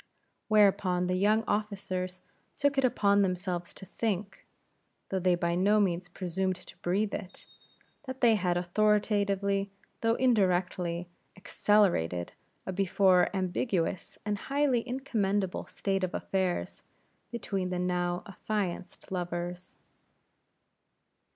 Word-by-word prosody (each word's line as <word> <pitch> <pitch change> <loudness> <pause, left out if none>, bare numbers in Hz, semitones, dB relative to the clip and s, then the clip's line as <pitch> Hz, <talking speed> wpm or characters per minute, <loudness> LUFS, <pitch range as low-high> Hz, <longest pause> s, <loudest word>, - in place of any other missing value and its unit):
Whereupon, 195 -4 +3
the 180 0 0
young 210 +4 +3
officers 190 -4 -3 0.3
took 285 -1 +1
it - - +1
upon 200 -5 +3
themselves 180 -2 -1
to 195 - -10
think 200 -1 -3 0.6
though 190 - 0
they 180 -1 +3
by 170 0 0
no 200 +4 +3
means 180 -3 0
presumed 185 +1 -2
to 180 - -13
breathe 200 +4 0
it 190 -2 -7 0.6
that 260 0 -5
they 235 -3 +5
had 180 -4 +1
authoritatively, 200 +1 +1 0.3
though 225 0 +2
indirectly, 180 -7 +1 0.3
accelerated 180 - +1 0.3
a 190 - -3
before 190 -1 +3
ambiguous 185 -1 -1
and 205 -1 -1
highly 275 -3 +2
incommendable 205 -7 -1
state 195 -1 -2
of 185 - -2
affairs 190 -2 -2 0.5
between 195 -5 -3
the 180 - -2
now 180 0 -1
affianced 195 -2 -4
lovers. 175 0 -4
190 Hz, 110 wpm, -30 LUFS, 180-210 Hz, 0.6 s, they